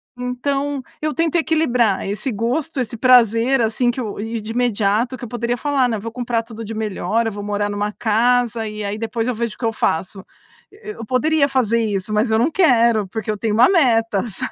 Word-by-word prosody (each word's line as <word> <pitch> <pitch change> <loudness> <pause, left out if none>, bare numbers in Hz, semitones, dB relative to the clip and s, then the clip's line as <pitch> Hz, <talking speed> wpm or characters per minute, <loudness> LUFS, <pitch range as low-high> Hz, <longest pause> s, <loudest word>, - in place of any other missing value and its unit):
Então 275 +3 -2 0.2
eu 305 0 -1
tento 330 +1 0
equilibrar 250 - +1
esse 210 +6 -2
gosto, 260 +8 -2
esse 235 -2 -3
prazer 245 +1 +4
assim 230 +2 +1
que 255 - -7
eu 215 -5 -5
e 225 +2 -3
de 215 - -6
imediato 235 +1 0
que - - -12
eu - - -4
poderia 240 +1 -2
falar, 275 -2 +1
né: 225 - -1
"Vou 230 +2 -6
comprar 235 -1 -2
tudo 225 -1 -9
de 225 +1 -6
melhor, 215 +1 -1
eu 225 - -2
vou 205 0 -7
morar 205 0 -1
numa 205 +1 -2
casa 235 0 +1
e 210 0 -6
aí 205 +1 -3
depois 225 +1 -3
eu 250 - -1
vejo 230 -2 -3
o - - -27
que 240 - -4
eu 225 - 0
faço." 190 +1 -2 0.5
Eu 425 0 -10
eu 225 - -6
poderia 280 +4 +2
fazer 235 -4 +1
isso, 205 -1 -2
mas 215 +2 +1
eu 220 - +3
não 255 +8 +2
quero 235 - +3
porque 220 +2 -6
eu 210 - -4
tenho 215 0 -1
uma 235 +4 +5
meta, 230 - +2
sabe. 200 - -5
230 Hz, 220 wpm, -20 LUFS, 215-255 Hz, 0.5 s, uma